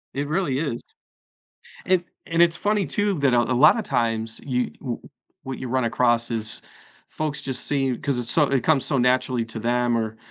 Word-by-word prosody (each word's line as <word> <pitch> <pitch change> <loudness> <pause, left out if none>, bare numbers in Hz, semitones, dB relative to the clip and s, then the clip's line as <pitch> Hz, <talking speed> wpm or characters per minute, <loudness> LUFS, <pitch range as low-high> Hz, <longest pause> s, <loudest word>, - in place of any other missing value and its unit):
It 140 +1 -2
really 155 -5 0
is. 140 -7 -2 1.1
And 185 -1 +3 0.2
and 165 0 0
it's 170 -1 +3
funny 205 0 0
too, 205 -1 0
that 135 -3 +3
a 120 - +5
a 125 - -1
lot 150 - +6
of 215 - -3
times, 115 -1 -1
you, 125 -2 -1
w 125 -4 -4 0.5
what 130 -1 -5
you 130 - -5
run 130 0 0
across 120 0 +2
is 110 -1 -3 0.5
folks 150 -2 -3
just 130 -2 -3
see, 135 -3 0
'cause 140 -3 -1
it's 120 -1 -2
so 155 - +4
it 135 -3 0
comes 155 -4 +3
so 140 - 0
naturally 125 -1 +1
to 110 0 -7
them 120 +1 +1
or 110 0 -3
130 Hz, 200 wpm, -23 LUFS, 120-150 Hz, 1.1 s, lot